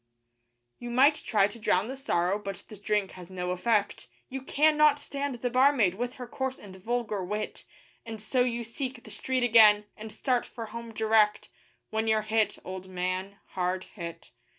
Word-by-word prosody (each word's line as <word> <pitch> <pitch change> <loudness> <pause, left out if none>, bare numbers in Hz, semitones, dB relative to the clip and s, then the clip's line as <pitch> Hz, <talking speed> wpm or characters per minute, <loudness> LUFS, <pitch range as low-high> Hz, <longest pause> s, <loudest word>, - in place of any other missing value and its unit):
You 240 - -6
might 265 +5 +5
try 215 -8 +1
to 210 +3 -5
drown 200 -1 +1
the 265 - -5
sorrow, 200 -8 0
but 200 -1 -5
the 215 - -9
drink 205 -1 -1
has 180 -1 -11
no 180 -1 -3
effect; 205 +3 0 0.2
You 265 +1 -5
cannot 300 +1 +4
stand 280 -1 -4
the 245 +1 -3
barmaid 255 -7 +4
with 245 +5 -4
her 250 - -7
coarse 265 +1 -3
and 195 -2 -12
vulgar 215 0 -2
wit; 210 +3 -4 0.4
And 225 -1 -7
so 245 +4 0
you 240 -1 0
seek 250 +2 -5
the - - -11
street 260 -1 -1
again, 215 -3 +6
and 220 0 -8
start 250 0 0
for 230 -2 -8
home 230 +1 -8
direct, 220 -1 +2 0.4
When 220 +1 -1
you're 220 -1 +2
hit, 220 0 +1
old 185 0 -7
man 185 +2 -3
hard 185 0 -1
hit. 170 -4 -9
220 Hz, 175 wpm, -28 LUFS, 195-250 Hz, 0.4 s, again